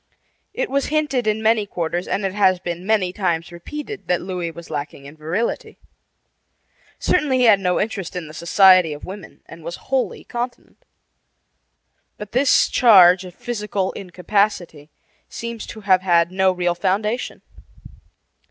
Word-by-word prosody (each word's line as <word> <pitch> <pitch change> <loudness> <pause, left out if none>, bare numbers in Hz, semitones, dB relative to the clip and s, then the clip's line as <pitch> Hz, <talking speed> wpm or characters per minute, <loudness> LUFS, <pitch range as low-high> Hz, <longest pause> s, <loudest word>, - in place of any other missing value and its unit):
It - - -3
was 280 0 0
hinted 290 -6 0
in 215 +1 0
many 220 -1 +2
quarters, 175 -1 -3
and 200 - -1
it 190 - -2
has 190 -3 +3
been 175 +1 -6
many 200 -5 +1
times 170 -5 -2
repeated, 300 - -8
that 180 - +1
Louis 180 -2 -4
was 170 0 -11
lacking 145 -2 -6
in 140 +2 -11
virility. 165 +9 -3 1.2
Certainly 295 -7 +1
he 250 - +2
had 215 -4 +6
no 180 -2 0
interest 195 -4 -3
in 180 -2 -4
the 155 - -11
society 180 0 +5
of 145 - -9
women 190 -1 -10
and 165 - -13
was 170 +2 -5
wholly 265 -1 -2
continent. 245 - -7 1.3
But 210 0 -9
this 260 +2 +3
charge 185 -6 +6
of 180 -1 -11
physical 210 -5 -3
incapacity 180 -4 -2 0.4
seems 235 -1 -6
to 220 - -9
have 190 -2 +3
had 170 -2 +2
no 190 0 +2
real 180 -1 0
foundation. 210 +6 -2
190 Hz, 150 wpm, -21 LUFS, 175-220 Hz, 1.3 s, had